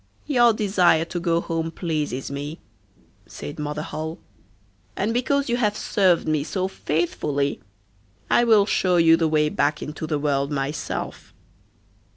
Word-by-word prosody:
'Your 240 -5 +4
desire 190 -6 +3
to 175 +1 -4
go 170 -1 +1
home 165 -1 -2
pleases 155 -6 -3
me,' 145 +3 -5 0.7
said 75 - -8
Mother 150 +1 -3
Holle, 160 +1 -5 0.8
'and 210 +4 0
because 275 +3 +1
you 240 0 +1
have 210 -3 0
served 185 -6 +2
me 155 -2 +1
so 185 +4 -2
faithfully, 150 -5 -1 0.7
I 240 - +4
will 220 -4 +5
show 185 -3 +2
you 165 -1 +6
the 165 -1 +1
way 155 -1 +2
back 150 0 0
into 150 +1 -6
the 155 - 0
world 140 -1 0
myself. 140 +1 -4
165 Hz, 145 wpm, -23 LUFS, 150-195 Hz, 0.8 s, you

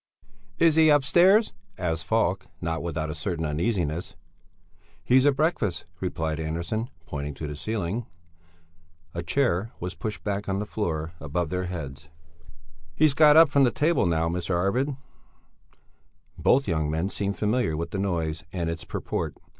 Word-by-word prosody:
"Is 165 -1 +5
he 160 -1 +6
upstairs?" 175 - +5 0.2
asked 80 -2 -2
Falk, 100 -4 +1
not 80 -1 -2
without 80 -2 -3
a - - -4
certain 80 +1 -2
uneasiness. 85 0 -1 0.9
"He's 130 +9 +4
at 140 - +4
breakfast," 135 - 0
replied 80 -4 -2
Andersson, 85 +9 -3 0.2
pointing 75 -2 -5
to 80 - -6
the 75 0 -5
ceiling. 110 +5 -3 1.1
A 85 - -3
chair 115 -4 0
was 90 +2 -4
pushed 110 -3 -5
back 100 -1 -2
on 95 - 0
the 105 - -2
floor 85 -6 -3
above 85 +3 -2
their 90 0 -1
heads. 80 -4 -7 0.9
"He's 155 -2 +4
got 150 +1 +6
up 165 -2 +8
from 140 -1 +4
the 125 - +5
table 150 - +2
now, 80 -1 +1
Mr. 85 +1 -1
Arvid." 125 +10 0 1.4
Both 135 +2 +3
young 80 -4 0
men 80 +5 -1
seemed 100 -1 -2
familiar 105 -6 0
with 85 +1 -4
the 95 - -3
noise 80 -5 -1
and 85 -3 -2
its 85 - -5
purport. - - -4
90 Hz, 155 wpm, -26 LUFS, 80-120 Hz, 1.4 s, up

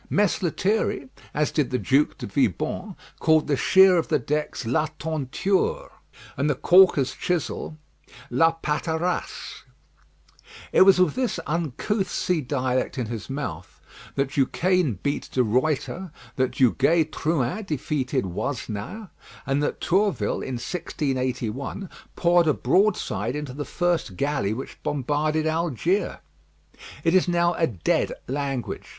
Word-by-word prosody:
Mess 205 0 +2
Lethierry, 185 -5 0 0.2
as 150 0 0
did 150 -4 0
the 125 - 0
Duke 135 +7 +2
de - - -6
Vibonne, - - -1 0.2
called 160 -1 +4
the 145 - +1
sheer 190 +5 +6
of 165 - 0
the - - +2
decks 150 0 -3
la 130 +7 +1
tonture, 185 - -1 0.4
and 145 +2 0
the 145 - +2
caulker's 175 -4 +5
chisel 165 -2 -3 0.5
la 165 +7 +4
patarasse. 160 +3 -2 1.1
It - - +5
was 190 -1 +7
with 180 -5 +4
this 250 -8 -1
uncouth 175 - -1
sea 175 -2 0
dialect 130 0 -1
in 125 - -1
his 115 -1 -6
mouth 130 - -5 0.4
that 135 -1 0
Duquesne 160 - +1
beat 140 - -2
De 130 - +2
Ruyter, 150 - -1 0.2
that 130 -1 0
Duguay 140 +6 +3
Trouin 155 - -1
defeated 140 - -1
Wasnaer, 115 - -5 0.3
and 135 +1 0
that 145 - -1
Tourville, 195 +2 +1
in 130 - -4
1681, 130 - -3 0.3
poured 175 -1 +3
a 150 - +3
broadside 130 - +1
into 150 -3 -5
the 145 +2 -5
first 175 - -1
galley 140 -8 0
which 120 +5 -6
bombarded 150 +3 0
Algiers. 165 - 0 0.9
It 165 -1 +2
is 185 0 +4
now 175 0 +2
a 165 - +1
dead 95 - 0
language. 135 -3 -3
150 Hz, 130 wpm, -24 LUFS, 130-175 Hz, 1.1 s, was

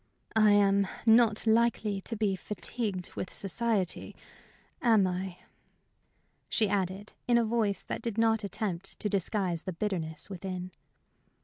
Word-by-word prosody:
"I 215 -2 +6
am 200 -1 +4 0.2
not 225 -1 +5
likely 220 -3 +2
to 225 - -4
be 205 -3 +1
fatigued 195 0 -3
with 185 - -5
society, 200 -2 -1 0.7
am 220 -5 +5
I?" 185 0 -3 1.1
she 220 - +2
added, 195 0 -2
in 240 -1 +5
a 235 - +3
voice 220 -3 0
that - - -5
did 230 -2 -4
not 225 -1 +3
attempt 195 -2 -2
to 210 - 0
disguise 190 -3 0
the 185 - -5
bitterness 165 -5 -3
within. 185 -1 -5
200 Hz, 130 wpm, -30 LUFS, 185-220 Hz, 1.1 s, I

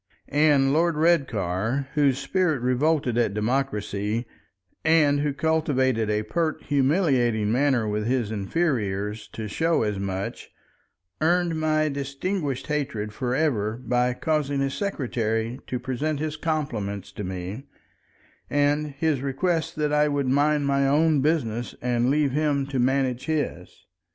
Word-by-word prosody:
And 145 -2 +4
Lord 165 +1 +2
Redcar, 130 - +1
whose 140 -4 +3
spirit 155 +1 0
revolted 130 -1 +1
at 110 -4 +1
democracy, 105 -2 -1 0.6
and 155 -3 +4
who 145 0 0
cultivated 135 -6 +1
a 105 0 0
pert 160 +7 -2
humiliating 130 - +2
manner 125 -2 +2
with 105 +1 -1
his 120 -4 0
inferiors 105 - -1
to 110 -1 -5
show 165 +6 +1
as 105 -2 -1
much, 95 0 -4 0.7
earned 170 0 +2
my 155 0 +2
distinguished 140 +1 -3
hatred 120 -8 -2
for 125 +2 -2
ever 115 -8 0
by 125 0 0
causing 145 -1 0
his 135 0 0
secretary 120 - -2
to 125 - -2
present 135 +4 -2
his 155 0 -2
compliments 115 - -3
to 105 - -6
me, 95 +7 -6 0.8
and 145 0 +1
his 150 -3 +1
request 160 +4 -1
that 150 -1 0
I 150 0 +4
would 145 -2 0
mind 145 +2 +2
my 140 0 +2
own 150 +1 +3
business 120 -6 -1
and 120 0 +1
leave 145 -1 +2
him 145 -1 +1
to 135 -3 -1
manage 130 0 +1
his. 155 -2 -3
135 Hz, 135 wpm, -25 LUFS, 115-150 Hz, 0.8 s, And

